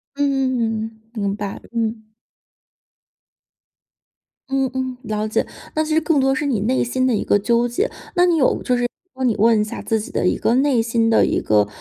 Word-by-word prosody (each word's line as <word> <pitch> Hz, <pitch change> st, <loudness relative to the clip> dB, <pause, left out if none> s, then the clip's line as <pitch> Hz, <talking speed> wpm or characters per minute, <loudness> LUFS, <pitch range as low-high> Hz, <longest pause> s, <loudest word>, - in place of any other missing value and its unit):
嗯， 240 Hz, -6 st, -1 dB
明 200 Hz, -3 st, -2 dB
白。 205 Hz, -2 st, -5 dB
嗯。 220 Hz, -2 st, -3 dB, 2.4 s
嗯 270 Hz, -1 st, +1 dB
嗯， 260 Hz, -1 st, -3 dB
了 215 Hz, -2 st, -2 dB
解。 215 Hz, -, 0 dB, 0.3 s
那 310 Hz, -, +2 dB
其 310 Hz, -, -2 dB
实 320 Hz, -, +3 dB
更 310 Hz, -2 st, +2 dB
多 270 Hz, 0 st, +2 dB
是 295 Hz, -, -2 dB
你 260 Hz, -7 st, 0 dB
内 250 Hz, +5 st, +1 dB
心 255 Hz, +2 st, 0 dB
的 250 Hz, -, +2 dB
一 -, -, -1 dB
个 205 Hz, -, +3 dB
纠 235 Hz, +3 st, +2 dB
结， 385 Hz, -, -1 dB, 0.3 s
那 355 Hz, -1 st, +5 dB
你 350 Hz, -2 st, +3 dB
有 280 Hz, -5 st, +2 dB
就 250 Hz, -, +1 dB
是 245 Hz, -, 0 dB, 0.3 s
帮 260 Hz, 0 st, -1 dB
你 230 Hz, -, +1 dB
问 225 Hz, 0 st, +4 dB
一 -, -, +2 dB
下 210 Hz, -, -6 dB
自 225 Hz, -, 0 dB
己 -, -, -8 dB
的 -, -, 0 dB
一 -, -, +1 dB
个 -, -, +1 dB
内 265 Hz, -2 st, +3 dB
心 225 Hz, 0 st, +1 dB
的 225 Hz, -, +4 dB
一 -, -, 0 dB
个 105 Hz, -1 st, +2 dB
240 Hz, 215 characters per minute, -20 LUFS, 220-265 Hz, 2.4 s, 那